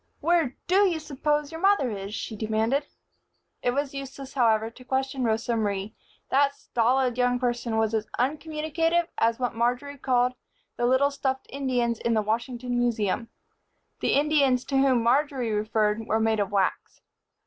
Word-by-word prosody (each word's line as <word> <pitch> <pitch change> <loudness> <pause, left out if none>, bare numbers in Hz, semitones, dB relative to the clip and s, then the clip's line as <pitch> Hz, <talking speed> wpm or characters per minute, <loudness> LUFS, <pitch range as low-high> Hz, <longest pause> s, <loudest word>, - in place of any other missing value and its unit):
"Where 325 -5 +1
do 390 +3 +4
you 335 -3 -1
s'pose 295 0 -1
your 325 0 -7
mother 385 - +3
is?" 200 +1 -5
she 220 - -5
demanded. 220 +6 0 0.7
It - - +1
was 280 +2 -1
useless, 275 0 -7
however, 225 -3 +2
to 255 - -15
question 265 0 -1
Rosa 225 +1 0
Marie. 205 -1 -2 0.4
That 280 +1 +3
stolid 250 +1 +1
young 245 0 +3
person 240 -2 -1
was 220 0 +1
as 220 -1 -1
uncommunicative 315 +4 0
as 230 0 +2
what 250 -1 -2
Marjory 250 +5 -1
called 250 -1 +2 0.4
"the 240 - 0
little 265 +3 +3
stuffed 265 -1 -2
Indians 245 -4 -1
in 235 -1 0
the 215 - +2
Washington 240 +3 -2
Museum." 230 -2 0 0.7
The - - +1
Indians 280 -3 +3
to 275 - 0
whom 260 -4 +3
Marjory 255 -1 +1
referred 215 +1 0
were 220 - +1
made 220 -1 +1
of 200 -1 -1
wax. 195 -2 -1
250 Hz, 160 wpm, -26 LUFS, 225-280 Hz, 0.7 s, do